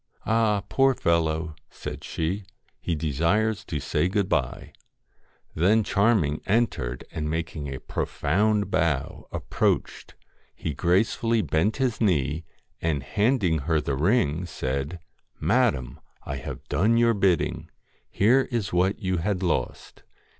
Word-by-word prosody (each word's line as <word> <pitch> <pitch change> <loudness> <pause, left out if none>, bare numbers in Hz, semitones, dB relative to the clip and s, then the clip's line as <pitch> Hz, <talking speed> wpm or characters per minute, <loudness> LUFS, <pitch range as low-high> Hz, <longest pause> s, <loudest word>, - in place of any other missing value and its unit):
'Ah! 110 -3 +2
poor 135 +2 +3
fellow,' 80 -3 0 0.2
said - - -7
she; 90 +6 -2 0.4
'he 85 - -2
desires 85 +9 0
to 80 -7 -4
say 85 - 0 1.5
Then 105 +7 +3
Charming 100 -9 +2
entered, 100 - 0
and 75 -1 -3
making 80 -2 -3
a 65 - -5
profound 105 +3 0
bow, 80 -5 -1
approached: - - -1 0.4
he 80 - -4
gracefully 110 - +1
bent 95 +8 +1
his 130 -5 -1
knee, 80 - +1 0.4
and 75 -5 0
handing 100 - +1
her 80 +3 +1
the 70 - -2
ring, 85 - +1
said 70 +3 -3 0.2
' - - -43
Madam! 60 -1 +1 0.2
I 65 - -4
have - - -8
done 110 +6 +2
your 115 0 +4
bidding. 95 -5 +1 0.4
Here 125 +7 +3
is 115 -6 -2
what 95 +3 +2
you 95 -1 0
had 95 +2 -1
lost. 85 - -2
90 Hz, 125 wpm, -25 LUFS, 80-110 Hz, 1.5 s, your